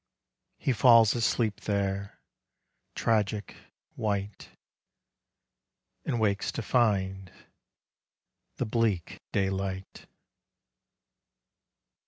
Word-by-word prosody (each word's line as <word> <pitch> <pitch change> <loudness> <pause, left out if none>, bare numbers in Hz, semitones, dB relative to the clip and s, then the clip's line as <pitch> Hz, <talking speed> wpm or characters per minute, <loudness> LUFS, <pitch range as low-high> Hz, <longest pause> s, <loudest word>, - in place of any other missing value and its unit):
He 135 - 0
falls 115 -1 +6
asleep 115 -2 0
there, 100 -1 -2 0.8
tragic 105 -3 0 0.4
white, 100 -2 -3 0.8
— - - -55
And 120 - 0
wakes 105 -2 +1
to - - -4
find 95 -5 +1 1.2
the - - -2
bleak 110 -6 -1
daylight. 95 -1 -3
100 Hz, 70 wpm, -28 LUFS, 95-110 Hz, 1.2 s, falls